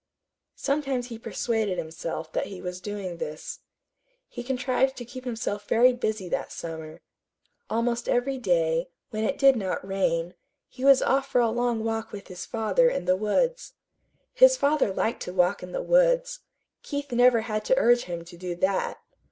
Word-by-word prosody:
Sometimes 275 -3 -1
he 230 -2 -7
persuaded 220 -5 -1
himself 160 0 -5
that - - -1
he 195 -2 -8
was 180 0 -6
doing 195 -3 -5
this. 155 -1 -6 0.7
He 245 - -7
contrived 260 +1 0
to 245 - -6
keep 255 +2 -10
himself 225 -4 -3
very 250 +2 +5
busy 215 -5 -2
that - - -2
summer. 160 -1 -7 0.7
Almost 235 +1 -1
every 260 +2 +1
day, 165 -5 +1 0.2
when 215 0 -2
it 275 +5 0
did 275 -1 +6
not 190 -3 -3
rain, 175 -3 0 0.3
he 255 - -10
was 275 -1 +6
off 270 0 +2
for 250 - +2
a 230 -2 +3
long 240 -1 0
walk 225 0 -2
with 200 -1 -9
his 180 -1 -7
father 235 - +2
in 335 - -3
the 185 +1 +3
woods. 485 - 0 0.6
His - - +6
father 285 - +2
liked 220 +4 -1
to 180 - -5
walk 180 +1 +2
in 180 - -8
the - - -3
woods. - - +3 0.4
Keith 285 -2 -5
never 245 -1 +5
had 215 -1 -3
to 260 - +3
urge 240 0 +4
him 170 -1 -6
to 175 0 -12
do 180 0 -4
that. 190 +2 -1
225 Hz, 175 wpm, -26 LUFS, 185-260 Hz, 0.7 s, did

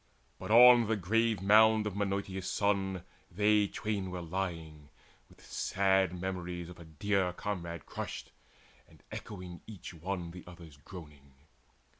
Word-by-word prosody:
But - - -7
on 120 0 +8
the 110 - +1
grave 110 +1 +1
mound 110 +1 +6
of 105 -3 -3
Menoetius' 100 -2 -2
son 95 -3 0 0.3
They 105 +2 +3
twain 100 -2 -3
were 90 -1 -5
lying, 80 -4 -5 0.4
with - - -19
sad 95 -2 +1
memories 90 -2 -4
Of 90 - -12
a 85 - -11
dear 90 +3 0
comrade 85 -6 -5
crushed, - - -6 0.6
and - - -21
echoing 90 -4 -8
Each 95 -5 -9
one 85 +1 -4
the 90 0 -10
other's 85 -4 -12
groaning. 75 -4 -13
95 Hz, 135 wpm, -32 LUFS, 85-105 Hz, 0.6 s, on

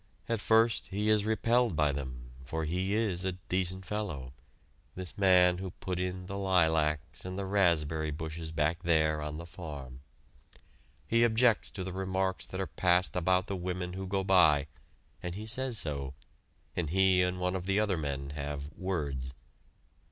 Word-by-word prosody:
At 115 -3 -1
first, 110 +1 +3
he 105 +2 0
is 105 -1 +3
repelled 115 -1 +2
by 75 -1 +3
them, 65 -3 -6
for 80 +5 -3
he 90 +5 -1
is 100 -5 0
a 95 -1 0
decent 95 +1 -2
fellow, 85 -13 -4 0.6
this 90 -1 -5
man 90 -2 +5
who 95 0 -4
put 90 -1 -3
in 90 0 -3
the 100 +2 -5
lilacs 80 -5 +1
and 95 +1 -5
the 100 - -2
raspberry 80 -5 +2
bushes 80 +1 -5
back 80 +2 0
there 80 -3 +2
on 75 0 -4
the 85 - -7
farm. 70 -7 -8 1.1
He 115 +1 +3
objects 115 0 +3
to 95 - -6
the 95 0 -5
remarks 95 0 -1
that 95 - -6
are 95 - 0
passed 90 0 +1
about 90 +1 +2
the 100 - -3
women 90 0 -3
who 95 0 -5
go 95 +1 0
by, 80 -7 +5 0.6
and 90 0 -4
he 105 +2 -6
says 125 +1 0
so, 70 -6 -2 0.6
and 85 -4 -1
he 95 +1 +4
and 90 0 0
one 90 +1 0
of 95 0 -4
the 95 +1 +2
other 105 -3 +2
men 70 -2 -3
have 70 0 -5
"words." 70 -9 -3
90 Hz, 170 wpm, -31 LUFS, 80-95 Hz, 1.1 s, man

